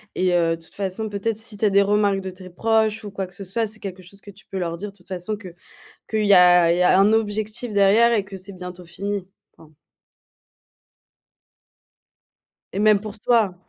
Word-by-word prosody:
et 185 -1 +1
heu, 165 -1 +2
de - - -20
toute 165 - -15
façon, 200 +2 -3
peut-être 205 +2 -2
si 220 -2 -3
tu 220 - -7
as 210 - +5
des 200 +1 +4
remarques 200 -1 +2
de 190 0 -6
tes 185 0 -12
proches 220 +2 0
ou 205 - -7
quoi 195 -1 -4
que 185 - -14
ce 195 +2 -8
soit, 220 +4 -1
c'est 215 +1 -6
quelque 185 -2 -8
chose 195 +3 -16
que 200 - -13
tu 195 +1 -20
peux 195 - -7
leur 170 -2 -2
dire, 200 +4 -7
de 200 - -24
toute 180 - -24
façon, 190 +3 -4
que 185 -5 -11 0.5
qu'il 215 -1 0
y 200 - +5
a 180 -2 +6
il 175 - +1
y - - +1
a 180 - +5
un 200 +2 +5
objectif 215 +1 -1
derrière 210 +4 +4
et 205 -3 +1
que 195 0 -9
c'est 190 +1 -8
bientôt 180 -1 -9
fini. 195 +2 -5 0.3
Enfin 155 -1 -19 3.0
Et 195 - -3
même 210 -1 +5
pour 215 +1 -9
toi, 220 -5 +2
200 Hz, 220 wpm, -22 LUFS, 185-215 Hz, 3.0 s, a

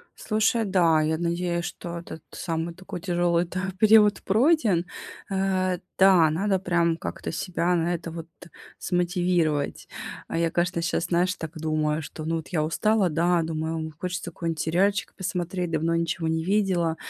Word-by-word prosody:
Слушай, 220 +1 +1
да, 175 -5 +3
я 160 +1 +1
надеюсь, 170 +1 -1
что 170 -1 -6
этот 160 -2 -10
самый 165 -1 -3
такой 185 0 -8
тяжёлый-то 175 0 0 0.2
период 210 -1 +5
пройден. 220 - +3 0.5
Э, 185 -2 0 0.2
да, 185 -5 +6
надо 190 +4 +1
прям 170 -2 +1
как-то - - -5
себя 175 +1 0
на 170 +1 0
это 170 0 -5
вот 165 0 -7 0.5
смотивировать. 175 -4 0 0.4
А - - -4
я, 165 0 +1
конечно, 175 0 0
щас, 170 0 0
знаешь, 180 +1 +1
так 160 -1 -7
думаю, 155 0 0
что, 155 +1 -8
ну, 165 +1 -1
вот 160 - -6
я 155 -3 +1
устала, 205 +5 +2
да, 170 +2 +2
думаю- 160 0 -3
ом, 160 -1 -4
хочется 180 -1 -4
какой-нибудь 165 -1 -4
сериальчик 195 +5 +1
посмотреть, 180 -1 -3
давно 165 +1 0
ничего 165 0 -1
не 160 0 0
видела. 185 -5 +1
175 Hz, 155 wpm, -25 LUFS, 165-185 Hz, 0.5 s, да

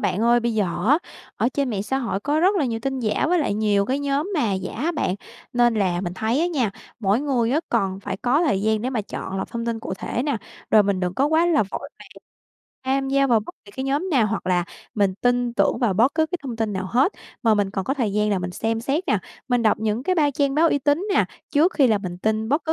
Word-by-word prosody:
bạn 195 - 0
ơi. 240 +1 +4
Bây 235 -1 -1
giờ 210 -2 +2 0.2
á, 290 +4 +6 0.4
ở - - +2
trên 280 -3 0
mạng 200 -3 -2
xã 265 +6 -1
hội 230 -7 -2
có 295 +7 0
rất 375 +4 +4
là 320 - +2
nhiều 230 -3 -2
tin 265 0 -2
giả 220 +4 0
với 355 +1 +3
lại 285 -10 0
nhiều 205 -2 +2
cái 265 +2 0
nhóm 285 +4 -1
mà 235 - +1
giả 190 -1 -3
á 310 +9 -1
bạn, 240 - -1 0.4
nên 240 -1 +3
là 185 -4 +1
mình 180 -1 -4
thấy 225 +7 0
á 340 - +2
nha, 275 - 0 0.3
mỗi 205 +2 +2
người 255 -5 +1
á 295 +5 +2
còn 195 -4 0
phải 200 -1 -4
có 255 - +2
thời 205 - +1
gian 220 0 +1
để 255 - -1
mà 245 -4 -1
chọn 195 -1 -6
lọc - - -4
thông 235 0 -4
tin 230 -1 -2
cụ - - -5
thể 245 - -2
nè, 285 -2 0 0.3
rồi 215 - +7
mình 200 -2 0
đừng 180 0 -1
có 275 - +2
quá 320 +3 +3
là 320 -8 +3
vội 195 - -6
vàng - - -13 0.8
tham 270 +1 0
gia 275 0 +3
vào 235 -4 +3
bất 240 - -10
kỳ 200 - -14
cái 260 +5 -4
nhóm 285 +8 -1
nào 255 -8 +3
hoặc 220 +2 -3
là 180 -1 +2 0.3
mình 200 -3 +2
tin 245 +3 +1
tưởng - - +2
vào 235 -7 +1
bất 235 +8 +3
cứ 315 0 +2
cái 360 +2 -4
thông 250 -5 -5
tin 220 -2 -1
nào 190 -1 -3
hết. 265 - +3 0.3
Mà 225 -3 +4
mình 205 -2 0
cần 195 -1 -3
có 270 - -1
thời 230 -8 -1
gian 210 0 +1
là 200 - +1
mình 180 0 -4
xem 225 +4 -2
xét 280 +9 -1
nè, - - +3 0.3
mình 245 -2 +2
đọc 215 - +3
những 220 +2 -1
cái 370 +6 +1
ba 300 -4 +3
trang 280 0 0
báo 325 +3 +4
uy 285 - +2
tín 290 +7 +1
nè, - - +4 0.3
trước 315 +5 +3
khi 275 - +5
là 220 -4 +3
mình 180 -3 -6
tin 220 +2 0
bất 290 +6 +1
cứ 320 - +1
235 Hz, 275 wpm, -23 LUFS, 210-280 Hz, 0.8 s, rồi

